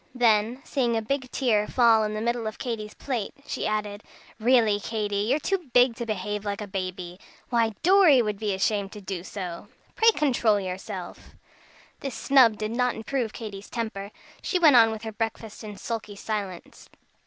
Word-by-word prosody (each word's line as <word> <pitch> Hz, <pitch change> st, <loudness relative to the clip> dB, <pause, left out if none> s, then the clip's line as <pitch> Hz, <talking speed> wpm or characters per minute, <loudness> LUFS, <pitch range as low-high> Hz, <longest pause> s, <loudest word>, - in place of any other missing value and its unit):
Then, 230 Hz, +1 st, +2 dB
seeing 245 Hz, -7 st, 0 dB
a -, -, 0 dB
big 260 Hz, +2 st, -2 dB
tear 220 Hz, -7 st, +1 dB
fall 230 Hz, -3 st, +4 dB
in 215 Hz, 0 st, -2 dB
the 215 Hz, -, -3 dB
middle 235 Hz, 0 st, -1 dB
of 215 Hz, -, -5 dB
Katy's 220 Hz, -4 st, -5 dB
plate, 245 Hz, -7 st, -4 dB
she -, -, -3 dB
added: 210 Hz, -1 st, -2 dB, 0.4 s
"Really, 225 Hz, -3 st, +4 dB
Katy, 205 Hz, -1 st, -2 dB
you're 220 Hz, +8 st, +1 dB
too 350 Hz, -1 st, -2 dB
big 245 Hz, -1 st, +5 dB
to 235 Hz, -, -4 dB
behave 210 Hz, 0 st, -3 dB
like 200 Hz, -1 st, -3 dB
a 210 Hz, -, -4 dB
baby. 185 Hz, -2 st, -5 dB, 0.3 s
Why 230 Hz, -3 st, +2 dB
Dorry 360 Hz, -6 st, +6 dB
would 210 Hz, -4 st, -1 dB
be 215 Hz, -2 st, -1 dB
ashamed 200 Hz, 0 st, 0 dB
to 210 Hz, -, -9 dB
do 190 Hz, -3 st, -5 dB
so. 185 Hz, -1 st, -6 dB, 0.3 s
Pray 450 Hz, -, +6 dB
control 250 Hz, -, +2 dB
yourself!" 185 Hz, -1 st, -7 dB, 0.6 s
This 275 Hz, -3 st, -5 dB
snub 250 Hz, -6 st, +5 dB
did 215 Hz, 0 st, -3 dB
not 250 Hz, +1 st, +1 dB
improve 230 Hz, 0 st, -2 dB
Katy's 205 Hz, -3 st, -8 dB
temper. 220 Hz, -4 st, -4 dB, 0.3 s
She 370 Hz, -, 0 dB
went 315 Hz, -6 st, +6 dB
on 225 Hz, -2 st, +7 dB
with 220 Hz, 0 st, -6 dB
her 220 Hz, -, -4 dB
breakfast 225 Hz, 0 st, -5 dB
in 210 Hz, -2 st, -8 dB
sulky 215 Hz, -1 st, -5 dB
silence. 200 Hz, -4 st, -6 dB
220 Hz, 175 wpm, -26 LUFS, 205-245 Hz, 0.6 s, on